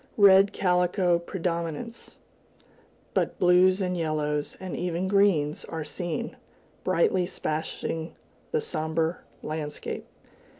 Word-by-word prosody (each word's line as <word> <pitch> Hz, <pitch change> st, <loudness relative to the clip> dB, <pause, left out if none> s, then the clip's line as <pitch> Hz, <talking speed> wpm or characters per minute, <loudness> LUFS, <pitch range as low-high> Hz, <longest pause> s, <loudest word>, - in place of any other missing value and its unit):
Red 200 Hz, -1 st, +7 dB
calico 180 Hz, -1 st, +2 dB
predominates, 170 Hz, +5 st, -4 dB, 1.0 s
but -, -, 0 dB
blues 185 Hz, +2 st, +5 dB
and 180 Hz, -1 st, 0 dB
yellows, 150 Hz, -3 st, -1 dB
and 185 Hz, -2 st, -5 dB
even 175 Hz, +1 st, -1 dB
greens, 190 Hz, -7 st, +2 dB
are 160 Hz, -1 st, -4 dB
seen, 160 Hz, +3 st, -4 dB, 0.5 s
brightly 185 Hz, 0 st, +2 dB
splashing 160 Hz, -1 st, -3 dB, 0.4 s
the 465 Hz, -, +1 dB
somber 160 Hz, -, -1 dB, 0.2 s
landscape. 155 Hz, -1 st, -5 dB
175 Hz, 95 wpm, -27 LUFS, 160-190 Hz, 1.0 s, Red